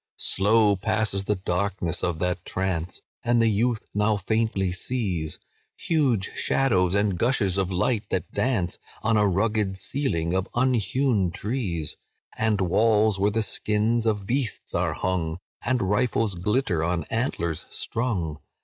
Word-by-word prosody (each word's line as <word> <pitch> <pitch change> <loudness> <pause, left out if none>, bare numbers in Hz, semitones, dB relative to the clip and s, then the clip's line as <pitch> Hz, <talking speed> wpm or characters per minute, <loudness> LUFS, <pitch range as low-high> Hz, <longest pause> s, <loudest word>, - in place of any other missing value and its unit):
"Slow 105 +1 +3
passes 100 0 0
the 105 - +1
darkness 95 -2 -1
of 85 -2 0
that 90 +1 -1
trance, 90 -3 -3 0.2
And 120 0 +2
the 115 -1 +4
youth 115 +2 0
now 105 +1 +2
faintly 100 -2 0
sees 90 -6 -2 0.4
Huge 130 - +1
shadows 95 -9 +2
and 100 -3 +1
gushes 115 -6 +2
of 95 -1 0
light 105 +4 0
that 90 - -2
dance 110 -9 0 0.2
On 115 +1 +2
a 105 -1 +4
rugged 100 0 0
ceiling 95 - -1
of 95 +1 0
unhewn 125 -4 +2
trees, 95 - -3 0.4
And 110 -3 +1
walls 105 +2 +3
where 100 +2 +3
the 110 +1 +1
skins 110 +2 0
of 105 -3 0
beasts 125 +1 -2
are - - 0
hung, 85 -3 -1 0.3
And 125 -1 +1
rifles 105 +1 +1
glitter 90 -2 0
on 85 -1 0
antlers 85 - -2
strung. 95 -11 -2
105 Hz, 140 wpm, -25 LUFS, 90-115 Hz, 0.4 s, the